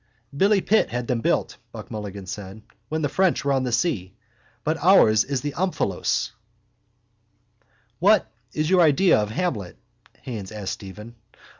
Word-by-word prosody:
—Billy 200 Hz, +5 st, +3 dB
Pitt 220 Hz, +4 st, +2 dB
had 125 Hz, 0 st, -3 dB
them 120 Hz, -1 st, -1 dB
built, -, -, 0 dB
Buck -, -, -10 dB
Mulligan 100 Hz, -2 st, -6 dB
said, 100 Hz, +2 st, -8 dB, 0.3 s
when 155 Hz, 0 st, -2 dB
the -, -, +2 dB
French 185 Hz, 0 st, +1 dB
were 140 Hz, -, +2 dB
on 130 Hz, -1 st, +1 dB
the 125 Hz, -, -2 dB
sea. 110 Hz, -, -1 dB, 0.5 s
But 155 Hz, +1 st, -1 dB
ours 110 Hz, -, +6 dB
is 140 Hz, -2 st, -2 dB
the 145 Hz, -, -3 dB
omphalos. 185 Hz, +3 st, -1 dB, 1.7 s
—What 200 Hz, +3 st, +4 dB, 0.3 s
is 155 Hz, 0 st, -1 dB
your 185 Hz, +1 st, +4 dB
idea 170 Hz, -, +4 dB
of 105 Hz, -1 st, -1 dB
Hamlet? 110 Hz, -, -3 dB, 0.5 s
Haines 110 Hz, -6 st, -6 dB
asked 105 Hz, -3 st, -4 dB
Stephen. 105 Hz, +4 st, -10 dB
130 Hz, 150 wpm, -24 LUFS, 105-175 Hz, 1.7 s, ours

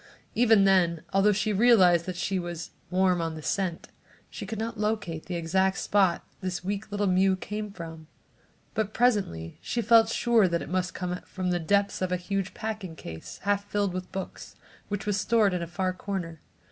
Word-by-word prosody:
Even 225 Hz, -4 st, +5 dB
then, 180 Hz, -4 st, +3 dB
although 195 Hz, +2 st, +5 dB
she 210 Hz, +1 st, 0 dB
realized 190 Hz, -6 st, +5 dB
that 185 Hz, -, -3 dB
she 185 Hz, +2 st, -1 dB
was 175 Hz, -2 st, -6 dB, 0.2 s
"warm 185 Hz, -1 st, +2 dB
on 165 Hz, -1 st, -2 dB
the 155 Hz, -, -8 dB
scent," 185 Hz, -2 st, -2 dB, 0.4 s
she 205 Hz, -, -7 dB
could 220 Hz, +2 st, -4 dB
not 225 Hz, 0 st, -4 dB
locate 210 Hz, -7 st, -2 dB
the 180 Hz, -, -3 dB
exact 190 Hz, +3 st, +1 dB
spot 190 Hz, -4 st, +2 dB, 0.2 s
this 185 Hz, -2 st, -3 dB
weak 200 Hz, +3 st, -3 dB
little 205 Hz, 0 st, 0 dB
mew 190 Hz, 0 st, +3 dB
came 210 Hz, +2 st, -5 dB
from. 165 Hz, -4 st, -9 dB, 0.7 s
But 215 Hz, -1 st, -2 dB
presently 200 Hz, -, +1 dB
she 240 Hz, -, -2 dB
felt 225 Hz, -1 st, +6 dB
sure 230 Hz, -3 st, +3 dB
that 170 Hz, -1 st, -1 dB
it -, -, -9 dB
must 180 Hz, -1 st, -1 dB
come 180 Hz, -1 st, -3 dB
from 185 Hz, -1 st, -2 dB
the 175 Hz, -, +1 dB
depths 200 Hz, +4 st, +1 dB
of 185 Hz, -1 st, -1 dB
a 180 Hz, -, +2 dB
huge 195 Hz, +1 st, -3 dB
packing 215 Hz, -6 st, -5 dB
case, 80 Hz, -, -9 dB
half 200 Hz, 0 st, +1 dB
filled 200 Hz, -3 st, 0 dB
with 185 Hz, 0 st, -5 dB
books, 190 Hz, -1 st, -7 dB, 0.3 s
which 205 Hz, 0 st, -4 dB
was 205 Hz, -1 st, 0 dB
stored 220 Hz, -5 st, +3 dB
in 180 Hz, -, -1 dB
a 170 Hz, -, -3 dB
far 185 Hz, +2 st, -1 dB
corner. 180 Hz, -4 st, -5 dB
190 Hz, 190 wpm, -27 LUFS, 175-205 Hz, 0.7 s, felt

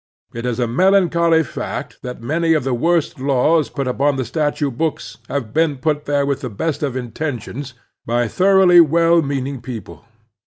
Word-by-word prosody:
It 115 Hz, +1 st, -4 dB
is 125 Hz, 0 st, -2 dB
a 120 Hz, -, +2 dB
melancholy 170 Hz, +3 st, +3 dB
fact 140 Hz, -, -6 dB
that 125 Hz, -2 st, -7 dB
many 165 Hz, +5 st, +1 dB
of 155 Hz, -, 0 dB
the 130 Hz, 0 st, -1 dB
worst 165 Hz, +4 st, 0 dB
laws 140 Hz, +4 st, +2 dB
put 135 Hz, -2 st, -4 dB
upon 140 Hz, +3 st, +1 dB
the 130 Hz, -2 st, -2 dB
statute 145 Hz, -3 st, -1 dB
books 120 Hz, -7 st, -3 dB
have 125 Hz, -6 st, -4 dB
been 160 Hz, -3 st, +1 dB
put 150 Hz, +1 st, -1 dB
there 145 Hz, -1 st, +1 dB
with 140 Hz, -1 st, -2 dB
the 125 Hz, -, -4 dB
best 145 Hz, +9 st, -3 dB
of 135 Hz, -4 st, -2 dB
intentions 125 Hz, +1 st, -5 dB, 0.3 s
by 120 Hz, +1 st, 0 dB
thoroughly 185 Hz, -, +5 dB
well 165 Hz, +1 st, +3 dB
meaning 140 Hz, -2 st, -3 dB
people. 120 Hz, -3 st, -8 dB
140 Hz, 170 wpm, -19 LUFS, 125-165 Hz, 0.3 s, thoroughly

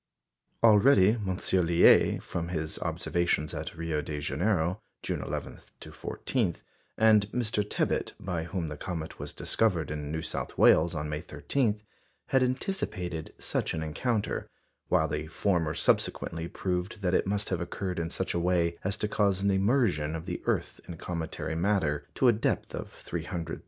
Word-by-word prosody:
Already 110 Hz, -1 st, +7 dB
M. 100 Hz, -5 st, -2 dB
Liais, 85 Hz, -2 st, +4 dB
from 85 Hz, -1 st, -3 dB
his 80 Hz, -3 st, -3 dB
observations 85 Hz, -3 st, 0 dB
at 80 Hz, +1 st, -5 dB
Rio 80 Hz, -2 st, -1 dB
de 75 Hz, 0 st, -4 dB
Janeiro, 85 Hz, +5 st, 0 dB, 0.2 s
June -, -, -2 dB
11 -, -, -5 dB, 0.2 s
to -, -, -10 dB
14, 110 Hz, -10 st, -2 dB, 0.4 s
and 110 Hz, -2 st, +5 dB
Mr. 110 Hz, -4 st, 0 dB
Tebbutt, 105 Hz, -, -1 dB
by 90 Hz, -3 st, -3 dB
whom 85 Hz, 0 st, -3 dB
the 75 Hz, -1 st, -5 dB
comet 80 Hz, -1 st, -5 dB
was -, -, -4 dB
discovered 90 Hz, -10 st, +1 dB
in 75 Hz, -1 st, -4 dB
New 80 Hz, 0 st, -3 dB
South -, -, -4 dB
Wales 85 Hz, +2 st, +5 dB
on 75 Hz, 0 st, -2 dB
May 75 Hz, 0 st, -3 dB
13, 105 Hz, -, -1 dB, 0.5 s
had 130 Hz, -, +4 dB
anticipated 110 Hz, -, -2 dB
such -, -, -2 dB
an 80 Hz, -, -2 dB
encounter, 105 Hz, +8 st, -1 dB, 0.4 s
while 80 Hz, -, +3 dB
the 75 Hz, 0 st, -3 dB
former 80 Hz, -2 st, 0 dB
subsequently 85 Hz, 0 st, +1 dB
proved 90 Hz, +4 st, -3 dB
that 90 Hz, 0 st, +1 dB
it -, -, +2 dB
must 100 Hz, +1 st, -1 dB
have 90 Hz, -3 st, -1 dB
occurred 90 Hz, 0 st, -3 dB
in 85 Hz, 0 st, -2 dB
such 95 Hz, +2 st, -2 dB
a 85 Hz, -, 0 dB
way 85 Hz, -1 st, +1 dB
as 95 Hz, +1 st, -1 dB
to 105 Hz, -, -1 dB
cause 100 Hz, -2 st, +1 dB
an 100 Hz, -, +3 dB
immersion 95 Hz, -, +2 dB
of 80 Hz, +1 st, -6 dB
the 90 Hz, -2 st, -4 dB
earth -, -, -1 dB
in 85 Hz, -, -7 dB
cometary 80 Hz, -1 st, -4 dB
matter 80 Hz, -5 st, 0 dB
to 130 Hz, -, +3 dB
a 120 Hz, -, +7 dB
depth 110 Hz, -, -1 dB
of -, -, -5 dB
300,000 85 Hz, 0 st, -5 dB
miles. -, -, -4 dB
90 Hz, 165 wpm, -29 LUFS, 80-100 Hz, 0.5 s, Already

